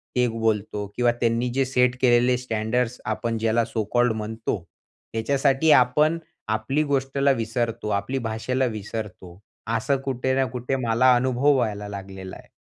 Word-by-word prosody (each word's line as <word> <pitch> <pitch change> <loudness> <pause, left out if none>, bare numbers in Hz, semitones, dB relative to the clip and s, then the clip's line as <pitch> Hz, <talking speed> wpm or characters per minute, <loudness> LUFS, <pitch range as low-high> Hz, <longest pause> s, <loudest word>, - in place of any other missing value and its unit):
ते 125 0 +3
बोलतो 110 -2 -1
किंवा 120 -1 +3
त्यांनी 115 +1 +1
जे 135 +1 +1
सेट 125 -1 +2
केलेले 125 0 +4
स्टँडर्ड्स 125 0 -1 0.2
आपण 115 -1 -2
ज्याला 115 +1 +2
सो 110 -1 -2
कॉल्ड 120 -1 +3
म्हणतो. 110 -3 -4 0.5
त्याच्यासाठी 135 +6 +2
आपण 150 +6 +4 0.3
आपली 110 +8 0
गोष्टला 140 -1 +1
विसरतो, 115 -2 -2
आपली 105 +6 -1
भाषेला 125 +4 -1
विसरतो. 105 -5 -6 0.4
असं 135 +4 0
कुठे 130 -1 -1
ना 135 0 +2
कुठे 125 +2 -3
मला 120 +3 +5
अनुभव 130 +3 +2
व्हायला 105 -5 -1
लागलेला 95 -1 -8
आहे. - - -18
120 Hz, 145 wpm, -24 LUFS, 110-130 Hz, 0.5 s, मला